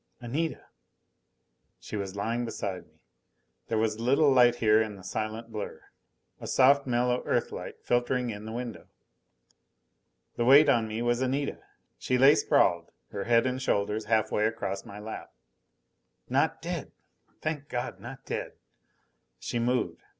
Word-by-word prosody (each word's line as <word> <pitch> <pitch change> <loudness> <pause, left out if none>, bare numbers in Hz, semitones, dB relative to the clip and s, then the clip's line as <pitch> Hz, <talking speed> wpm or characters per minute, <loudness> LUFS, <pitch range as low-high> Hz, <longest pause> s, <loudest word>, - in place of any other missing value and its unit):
Anita 140 +7 -3 1.1
She - - -8
was 100 -2 -4
lying 115 +4 -1
beside 100 -5 -5
me. - - -33 0.7
There 115 - -1
was 110 -1 0
a - - -7
little 140 +4 +4
light 120 -2 +5
here 110 -2 +4
in 110 -2 -3
the 95 - -13
silent 110 +4 -4
blur 105 -2 -6 0.6
a - - -7
soft 140 +1 +4
mellow 125 0 +1
Earthlight - - -2
filtering 120 0 0
in 105 0 -8
the 110 - -6
window. 120 -1 -6 1.5
The 120 - +1
weight 140 +4 +7
on 115 -4 +3
me 110 +2 -3
was 120 +1 +1
Anita. 135 +2 -1 0.4
She 125 - 0
lay 135 +3 +7
sprawled, 85 - +2 0.2
her 100 - -4
head 115 0 +4
and 130 0 -1
shoulders 105 -2 0
half 110 0 +1
way 105 +1 +2
across 100 -3 -4
my 100 - -10
lap. 105 +1 -8 0.9
Not - - 0
dead! - - -4 0.5
Thank 150 -2 -4
God, 120 0 -4
not - - -10
dead! - - -4 0.8
She 120 - -3
moved. 125 +1 0
120 Hz, 150 wpm, -28 LUFS, 110-125 Hz, 1.5 s, weight